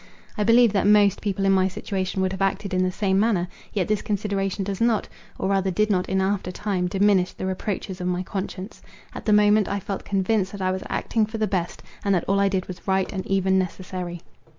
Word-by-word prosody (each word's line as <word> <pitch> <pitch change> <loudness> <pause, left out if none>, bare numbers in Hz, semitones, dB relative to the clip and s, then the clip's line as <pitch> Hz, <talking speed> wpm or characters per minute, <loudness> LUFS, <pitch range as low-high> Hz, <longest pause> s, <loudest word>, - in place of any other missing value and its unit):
I 210 - 0
believe 230 0 +5
that 195 -1 +2
most 205 -2 +5
people 195 -2 -1
in 195 - +4
my 190 -1 +4
situation 190 0 -2
would 185 - 0
have 190 0 -5
acted 195 0 -1
in 185 - +2
the 185 - +1
same 195 0 +1
manner. 200 -5 +2 0.2
Yet 190 -5 -1
this 215 -1 0
consideration 200 -1 -1
does 195 +1 -4
not, 230 -2 +2 0.3
or 190 - -1
rather 195 -1 +1
did 215 +3 +1
not 180 -2 0
in 190 0 +1
after 190 -1 -1
time, 185 -2 -1
diminish 195 -1 +2
the - - -5
reproaches 190 0 -3
of 180 - -2
my 180 0 -1
conscience. 190 +2 -6 0.3
At - - -8
the - - +4
moment, 210 0 +5
I 200 - -1
felt 195 0 -5
convinced 195 0 0
that 200 - -6
I 185 0 +1
was 190 0 -3
acting 220 -2 0
for 220 +1 -5
the 220 - +1
best, 185 -4 -3 0.2
and 200 -1 +2
that 175 - 0
all 195 +1 +2
I 200 0 +3
did 190 -1 -1
was 185 +1 -9
right 190 0 +1
and 190 -1 -3
even 190 -1 +2
necessary. 180 -1 -5
195 Hz, 230 wpm, -24 LUFS, 185-205 Hz, 0.3 s, believe